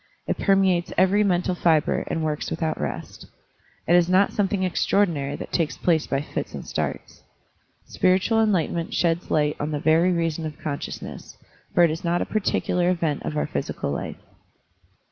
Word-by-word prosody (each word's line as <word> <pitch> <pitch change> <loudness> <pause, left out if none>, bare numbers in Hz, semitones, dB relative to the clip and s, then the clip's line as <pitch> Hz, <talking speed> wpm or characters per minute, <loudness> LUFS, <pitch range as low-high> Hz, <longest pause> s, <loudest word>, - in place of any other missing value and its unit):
It - - -2
permeates 190 -3 +2
every 190 +3 +4
mental 185 -2 +1
fibre 165 -3 +2
and 160 - -2
works 155 -1 -2
without 160 - -2
rest. 75 - -6 0.6
It 175 - +5
is 175 0 +4
not 190 +2 +3
something 200 -1 0
extraor 190 +2 +2
dinary 145 -6 -4
that - - -8
takes 165 -3 0
place 165 -3 +1
by 135 - 0
fits - - -5
and - - -7
starts. - - -4 0.6
Spiritual 190 +5 +2
enlightenment 175 -5 0
sheds 170 0 0
light 150 -1 +1
on 145 - -2
the 150 -1 -2
very 160 +4 +3
reason 165 -2 -1
of 150 - -9
consciousness, 145 -2 -6 0.4
for 175 - +6
it 165 - +4
is 160 - -5
not 175 0 +1
a - - -1
particular 180 -4 0
event 165 -5 0
of 150 - -4
our - - +1
psychical - - -3
life. 70 - -4
170 Hz, 170 wpm, -24 LUFS, 155-185 Hz, 0.6 s, for